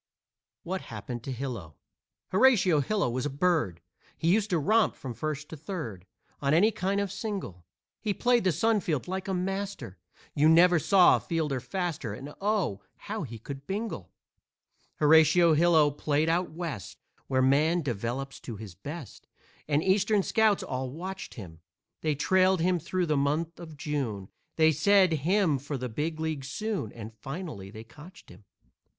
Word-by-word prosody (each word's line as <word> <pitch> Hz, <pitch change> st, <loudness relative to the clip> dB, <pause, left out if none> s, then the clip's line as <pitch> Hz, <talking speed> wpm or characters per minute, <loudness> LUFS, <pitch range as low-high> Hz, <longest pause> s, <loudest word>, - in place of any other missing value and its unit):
WHAT 185 Hz, +2 st, -3 dB
HAPPENED 120 Hz, +2 st, -7 dB
TO 135 Hz, -, -5 dB
HILO 120 Hz, -, -5 dB, 0.5 s
Horatio 190 Hz, -, +4 dB
Hilo 200 Hz, +6 st, 0 dB
was 125 Hz, +3 st, -2 dB
a -, -, -3 dB
bird, 145 Hz, -, 0 dB, 0.4 s
He 165 Hz, +2 st, +2 dB
used 215 Hz, 0 st, +1 dB
to 180 Hz, -, +2 dB
romp 215 Hz, +8 st, +2 dB
from 130 Hz, -3 st, -7 dB
first 150 Hz, +3 st, -4 dB
to -, -, -7 dB
third 135 Hz, -, -6 dB, 0.3 s
On 140 Hz, +2 st, +2 dB
any 210 Hz, +7 st, +5 dB
kind 200 Hz, -1 st, -1 dB
of 200 Hz, -2 st, -2 dB
single. 195 Hz, -, -5 dB, 0.3 s
He 215 Hz, -, -1 dB
played 240 Hz, +3 st, +2 dB
the 185 Hz, -, +3 dB
sun 215 Hz, +7 st, +2 dB
field 160 Hz, -6 st, -2 dB
like 190 Hz, +1 st, -4 dB
a 190 Hz, -, -1 dB
master, 190 Hz, -, -4 dB, 0.3 s
You 150 Hz, +2 st, +4 dB
never 175 Hz, +1 st, +6 dB
saw 185 Hz, +3 st, +5 dB
a -, -, -5 dB
fielder 155 Hz, -6 st, -2 dB
faster, 155 Hz, -, -3 dB
And 140 Hz, +5 st, -9 dB
oh, 195 Hz, -, 0 dB, 0.2 s
how 215 Hz, +1 st, -5 dB
he 115 Hz, -6 st, -6 dB
could 135 Hz, +5 st, -9 dB
bingle! 195 Hz, -, -4 dB, 0.8 s
Horatio 160 Hz, +2 st, +5 dB
Hilo 160 Hz, -2 st, +4 dB
played 150 Hz, +2 st, 0 dB
out 175 Hz, +2 st, +1 dB
West, 155 Hz, -, -6 dB, 0.3 s
Where 130 Hz, -1 st, +2 dB
man 155 Hz, +6 st, +3 dB
develops 125 Hz, +2 st, -3 dB
to 115 Hz, -, -7 dB
his 105 Hz, -3 st, -9 dB
best, 145 Hz, -, -9 dB, 0.4 s
And 150 Hz, +1 st, +1 dB
Eastern 200 Hz, +1 st, +2 dB
scouts 220 Hz, -1 st, +2 dB
all 130 Hz, 0 st, -3 dB
watched 185 Hz, +7 st, -7 dB
him; 85 Hz, -8 st, -10 dB, 0.4 s
They 155 Hz, -2 st, 0 dB
trailed 185 Hz, +5 st, +3 dB
him 180 Hz, +1 st, +2 dB
through 180 Hz, +3 st, -1 dB
the 155 Hz, -3 st, +1 dB
month 155 Hz, +4 st, -1 dB
of 160 Hz, -3 st, -10 dB
June, 130 Hz, -10 st, -3 dB, 0.3 s
They 160 Hz, 0 st, +5 dB
said, 185 Hz, +3 st, +4 dB
"Him 160 Hz, 0 st, +2 dB
for 145 Hz, +1 st, -4 dB
the 125 Hz, 0 st, -4 dB
big 155 Hz, +7 st, -3 dB
league 160 Hz, -3 st, -2 dB
soon," 185 Hz, -, -3 dB
And 110 Hz, -1 st, -9 dB
finally 135 Hz, -, -7 dB
they 110 Hz, +2 st, -10 dB
cotched 150 Hz, +10 st, -15 dB
him. 105 Hz, -, -16 dB
155 Hz, 165 wpm, -28 LUFS, 130-185 Hz, 0.8 s, never